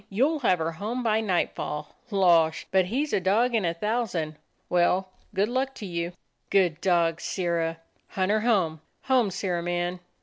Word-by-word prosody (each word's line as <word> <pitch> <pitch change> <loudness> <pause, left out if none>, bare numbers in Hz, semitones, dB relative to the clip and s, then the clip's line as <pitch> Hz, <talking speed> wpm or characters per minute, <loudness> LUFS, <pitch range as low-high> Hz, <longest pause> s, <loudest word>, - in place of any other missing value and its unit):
"You'll 275 +10 +1
have 205 -9 +3
her 165 0 -2
home 215 +9 -4
by 220 -1 +2
nightfall. 170 -6 -2
Losh! 170 -6 +3
but 190 -1 +4
he 255 +11 0
's 305 - -8
a - - +3
dog 215 +7 +2
in 225 -3 +2
a 170 - +1
thousand. 185 -6 -1 0.3
Well, 180 +2 +2 0.3
good 200 +2 +2
luck 260 +3 -1
to 210 - -7
you." 170 -1 -3 0.4
"Good 175 -5 +2
dog, 170 -2 +2
Sirrah! 170 -3 -1 0.3
Hunt 190 +1 -1
her 215 - +3
home; 190 -9 +1 0.2
home, 255 -5 +3
Sirrah 180 -2 -2
man!" 175 +1 -2
185 Hz, 170 wpm, -26 LUFS, 170-220 Hz, 0.4 s, but